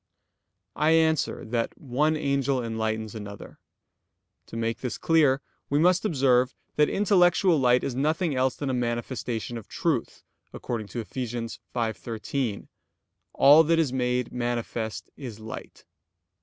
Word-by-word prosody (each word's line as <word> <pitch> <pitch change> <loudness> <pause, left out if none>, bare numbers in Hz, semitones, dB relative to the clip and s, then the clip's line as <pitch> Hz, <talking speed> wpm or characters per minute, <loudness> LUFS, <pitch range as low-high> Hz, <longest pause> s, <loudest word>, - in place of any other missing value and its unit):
I 155 +1 +3
answer 160 -2 +2
that, 115 +1 -2
One 150 +4 0
angel 140 -3 0
enlightens 110 -1 -2
another. 105 -2 -9 0.9
To - - -7
make 115 0 -1
this 125 - -4
clear, 145 -5 +3 0.3
we 145 - +2
must 180 +5 +3
observe 130 -7 +2 0.2
that 150 0 +4
intellectual 180 -3 +3
light 125 -1 +4
is 135 - -2
nothing 155 +4 0
else 130 0 +1
than 140 -2 -3
a - - -1
manifestation 120 -1 -3
of 110 - -14
truth, - - -2 0.3
according 115 -3 -4
to 120 - -4
Eph. 110 - -13
5:13: 115 -1 -3 0.7
"All 145 +4 +7
that 165 +1 +2
is 155 -6 +1
made 125 -1 0
manifest 120 -2 -3
is 120 -6 -8
light." 110 0 -9
125 Hz, 130 wpm, -26 LUFS, 115-150 Hz, 0.9 s, All